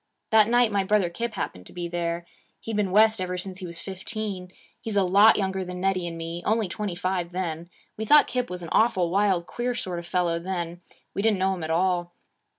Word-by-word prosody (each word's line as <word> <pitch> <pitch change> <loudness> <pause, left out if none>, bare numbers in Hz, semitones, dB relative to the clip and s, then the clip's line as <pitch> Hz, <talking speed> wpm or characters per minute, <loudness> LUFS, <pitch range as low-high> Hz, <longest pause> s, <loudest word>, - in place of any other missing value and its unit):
'That 220 -1 +6
night 240 -1 +4
my 200 -1 +1
brother 190 -3 +2
Kip 225 +5 -4
happened 90 - -5
to - - -15
be 175 -1 -4
there. 170 0 -3 0.3
He'd 225 - -5
been 205 -2 +1
West 215 +1 +4
ever 180 0 -2
since 185 +1 -5
he 185 - -6
was 170 0 -6
fifteen. 195 -1 -5 0.3
He's 220 -2 -4
a 200 - +4
lot 200 +4 +6
younger 190 -1 -1
than 180 0 -6
Nettie 185 -1 0
and 165 -1 -6
me 165 +1 -5
only 220 -1 +1
twenty 200 0 -4
five, 180 -1 -2
then. 170 -2 -3 0.3
We 220 - -3
thought 295 +6 +7
Kip 250 -1 -2
was 180 -1 -5
an 165 - -7
awful 185 -7 +3
wild, 195 -3 +2
queer 245 +5 -3
sort 180 -6 -3
of 170 - -9
fellow, 175 -2 0
then; 175 -1 -4 0.3
we - - -1
didn't 215 -1 +3
know 190 +1 +1
him 180 -3 -5
at 155 - -4
all. 175 +1 0
185 Hz, 225 wpm, -26 LUFS, 175-210 Hz, 0.3 s, thought